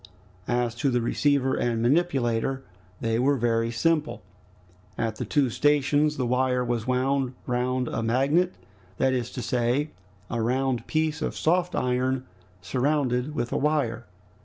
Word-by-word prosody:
As 120 Hz, -1 st, 0 dB
to 140 Hz, +3 st, +1 dB
the 125 Hz, -1 st, +1 dB
receiver 135 Hz, +2 st, +1 dB
and 120 Hz, -3 st, 0 dB
manipulator, 135 Hz, -2 st, +1 dB, 0.4 s
they 115 Hz, 0 st, 0 dB
were 140 Hz, +3 st, +3 dB
very 115 Hz, -1 st, +1 dB
simple. 150 Hz, -, 0 dB, 0.7 s
At 115 Hz, -2 st, -2 dB
the -, -, -3 dB
two 135 Hz, -4 st, +1 dB
stations 150 Hz, +2 st, +2 dB
the 130 Hz, -, 0 dB
wire 125 Hz, 0 st, +1 dB
was 120 Hz, -1 st, -2 dB
wound 130 Hz, 0 st, 0 dB
round 125 Hz, +1 st, 0 dB
a 115 Hz, -, -2 dB
magnet, 135 Hz, +10 st, +2 dB, 0.4 s
that 130 Hz, 0 st, +2 dB
is 120 Hz, -2 st, -1 dB
to 125 Hz, -, -4 dB
say, 125 Hz, +5 st, 0 dB, 0.4 s
round 125 Hz, +2 st, 0 dB
a -, -, -16 dB
piece 155 Hz, 0 st, -1 dB
of -, -, -3 dB
soft 175 Hz, +2 st, +1 dB
iron 130 Hz, +1 st, 0 dB, 0.4 s
surrounded 130 Hz, +4 st, 0 dB
with 120 Hz, -, -2 dB
a -, -, 0 dB
wire. 130 Hz, -7 st, 0 dB
130 Hz, 145 wpm, -26 LUFS, 120-145 Hz, 0.7 s, were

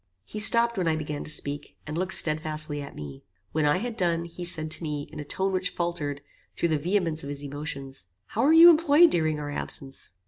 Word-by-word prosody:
He 215 Hz, -, -7 dB
stopped 235 Hz, +1 st, +6 dB
when 175 Hz, -, -1 dB
I 160 Hz, -, +1 dB
began 150 Hz, -2 st, -5 dB
to -, -, -4 dB
speak, 145 Hz, -1 st, -2 dB
and 150 Hz, -, -6 dB
looked 185 Hz, +2 st, +2 dB
stedfastly 155 Hz, -1 st, +1 dB
at 140 Hz, -, -10 dB
me. 70 Hz, -2 st, -10 dB, 0.3 s
When 155 Hz, -1 st, 0 dB
I 145 Hz, -, +2 dB
had 235 Hz, +3 st, -5 dB
done, 170 Hz, -5 st, -1 dB
he 170 Hz, +1 st, -9 dB
said, 155 Hz, -2 st, +1 dB
to 160 Hz, -, +4 dB
me, 150 Hz, -3 st, -5 dB
in -, -, -8 dB
a -, -, -5 dB
tone 190 Hz, +6 st, -3 dB
which 185 Hz, +1 st, -1 dB
faultered 150 Hz, -5 st, -4 dB, 0.3 s
through 170 Hz, -, -1 dB
the 155 Hz, -2 st, 0 dB
vehemence 170 Hz, -1 st, -1 dB
of 140 Hz, -, -8 dB
his 145 Hz, 0 st, -6 dB
emotions, 140 Hz, -, -6 dB, 0.2 s
"How -, -, -4 dB
were 290 Hz, -, +3 dB
you 335 Hz, +2 st, +9 dB
employed 325 Hz, +1 st, +4 dB
during 155 Hz, -3 st, 0 dB
our 145 Hz, 0 st, -6 dB
absence?" 135 Hz, -7 st, -5 dB
155 Hz, 220 wpm, -25 LUFS, 145-185 Hz, 0.3 s, you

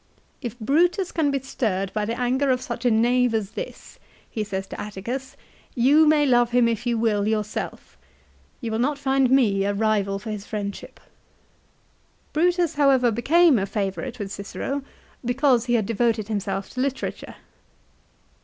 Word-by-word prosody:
" -, -, -39 dB
If 235 Hz, -, -9 dB
Brutus 340 Hz, -, +1 dB
can 315 Hz, -3 st, +1 dB
be 275 Hz, -1 st, 0 dB
stirred 195 Hz, -7 st, -2 dB
by 210 Hz, -1 st, -1 dB
the 230 Hz, +3 st, -3 dB
anger 260 Hz, +3 st, +1 dB
of. 255 Hz, -1 st, +2 dB
such 240 Hz, -1 st, -6 dB
a -, -, +5 dB
knave 240 Hz, +1 st, +3 dB
as 210 Hz, -2 st, -2 dB
this," -, -, -8 dB, 0.3 s
he 215 Hz, -, -3 dB
says 195 Hz, -2 st, -4 dB
to -, -, -7 dB
Atticus, 230 Hz, +6 st, -6 dB, 0.2 s
" -, -, -31 dB
you 305 Hz, +3 st, +6 dB
may 300 Hz, -1 st, +4 dB
love 240 Hz, -3 st, +4 dB
him, 245 Hz, -1 st, +3 dB
if 230 Hz, +1 st, -2 dB
you 235 Hz, -1 st, +1 dB
will, 210 Hz, -2 st, +1 dB
yourself; 215 Hz, -1 st, -3 dB, 0.6 s
you 230 Hz, -3 st, -3 dB
will 220 Hz, -, -1 dB
not 280 Hz, +4 st, +1 dB
find 270 Hz, -2 st, +2 dB
me 220 Hz, -7 st, +3 dB
a 200 Hz, 0 st, 0 dB
rival 205 Hz, -2 st, +1 dB
for 215 Hz, +2 st, -6 dB
his 205 Hz, -1 st, -6 dB
friendship." 205 Hz, -2 st, -6 dB
1 -, -, -28 dB, 1.2 s
Brutus, 345 Hz, 0 st, +2 dB
however, 270 Hz, -4 st, +3 dB
became 295 Hz, +4 st, +4 dB
a 195 Hz, -, -2 dB
favourite 210 Hz, +5 st, -3 dB
with 200 Hz, -3 st, -5 dB
Cicero, 235 Hz, +8 st, -4 dB, 0.4 s
because 245 Hz, 0 st, +2 dB
he 240 Hz, -1 st, +1 dB
had 220 Hz, -3 st, +1 dB
devoted 225 Hz, -1 st, 0 dB
himself 200 Hz, -2 st, -3 dB
to 255 Hz, -, -3 dB
literature. 270 Hz, 0 st, -3 dB
240 Hz, 175 wpm, -24 LUFS, 210-270 Hz, 1.2 s, you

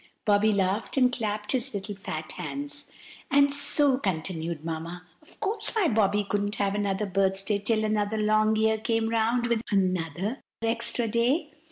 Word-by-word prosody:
Bobby 210 Hz, 0 st, +4 dB
laughed 200 Hz, +5 st, 0 dB
and 250 Hz, -1 st, +4 dB
clapped 210 Hz, -3 st, -2 dB
his 260 Hz, -2 st, +1 dB
little 200 Hz, +1 st, -4 dB
fat 155 Hz, -5 st, -5 dB
hands. 290 Hz, +1 st, -4 dB, 0.4 s
"And 280 Hz, 0 st, +4 dB
so," 285 Hz, -2 st, +3 dB
continued 165 Hz, -, -3 dB
Mamma, 165 Hz, +2 st, -5 dB, 0.2 s
"of -, -, -15 dB
course 430 Hz, +2 st, 0 dB
my 410 Hz, -7 st, +3 dB
Bobby 205 Hz, -2 st, +2 dB
couldn't 205 Hz, +1 st, -2 dB
have 200 Hz, -1 st, 0 dB
another 205 Hz, 0 st, -1 dB
birthday 195 Hz, +1 st, 0 dB
till 215 Hz, +1 st, +2 dB
another 215 Hz, 0 st, 0 dB
long 215 Hz, 0 st, +2 dB
year 220 Hz, 0 st, +2 dB
came 225 Hz, 0 st, 0 dB
round, 230 Hz, +2 st, +1 dB
with 235 Hz, -2 st, 0 dB
another 185 Hz, -, -1 dB, 0.2 s
extra 230 Hz, +1 st, 0 dB
day. 255 Hz, +8 st, +1 dB
215 Hz, 155 wpm, -27 LUFS, 195-235 Hz, 0.4 s, Bobby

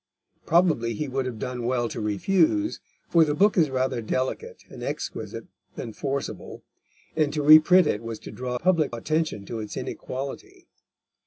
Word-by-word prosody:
Probably 155 Hz, -10 st, +2 dB
he 150 Hz, -, -3 dB
would 130 Hz, 0 st, -2 dB
have 120 Hz, -3 st, -5 dB
done 125 Hz, +1 st, -4 dB
well 120 Hz, 0 st, 0 dB
to 115 Hz, -, -5 dB
refuse, 180 Hz, -, +1 dB, 0.3 s
for 165 Hz, -1 st, +5 dB
the 150 Hz, -2 st, 0 dB
book 205 Hz, +5 st, +4 dB
is 160 Hz, -5 st, +3 dB
rather 130 Hz, -2 st, -1 dB
delicate 130 Hz, +4 st, -3 dB
and -, -, -11 dB
exquisite -, -, -5 dB, 0.3 s
than 115 Hz, -, -6 dB
forcible, 140 Hz, +2 st, -5 dB, 0.5 s
and 155 Hz, -2 st, +1 dB
to 150 Hz, -1 st, -1 dB
reprint 155 Hz, +4 st, +8 dB
it 105 Hz, -7 st, 0 dB
was 115 Hz, -1 st, -6 dB
to -, -, -9 dB
draw 125 Hz, 0 st, -4 dB
public 155 Hz, -4 st, +1 dB
attention 155 Hz, -5 st, -2 dB
to 115 Hz, -, -5 dB
its 105 Hz, -1 st, -6 dB
inequality. 355 Hz, -, -6 dB
135 Hz, 160 wpm, -25 LUFS, 120-160 Hz, 0.5 s, reprint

